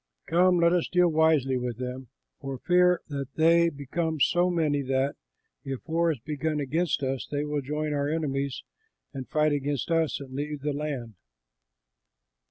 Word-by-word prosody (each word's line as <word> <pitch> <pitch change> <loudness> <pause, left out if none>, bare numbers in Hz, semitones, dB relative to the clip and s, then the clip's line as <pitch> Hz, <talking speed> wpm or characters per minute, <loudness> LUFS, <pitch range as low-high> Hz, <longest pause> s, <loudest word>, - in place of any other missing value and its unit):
Come, 180 +2 +4
let 170 0 +4
us 175 -2 +1
deal 180 -1 +3
wisely 155 -5 +3
with 125 -2 -3
them, 125 +1 -5 0.3
for 135 -1 -5
fear 180 +3 +3
that 140 -2 -5
they 170 +1 +5
become 160 +2 -3
so 175 +5 +3
many 155 -5 +1
that, 135 +1 0 0.5
if 135 +2 -6
war 165 +1 +2
is 150 - -3
begun 150 +4 -3
against 155 +2 0
us, 130 -1 -2
they 145 0 -2
will 150 -1 -2
join 150 +2 -2
our 145 0 0
enemies 140 -4 -2 0.5
and 130 -2 -7
fight 155 0 +2
against 145 +2 -2
us 165 -2 +1
and 135 -2 -10
leave 145 +1 -4
the 145 +1 -1
land." 140 -6 -4
150 Hz, 165 wpm, -27 LUFS, 135-165 Hz, 0.5 s, they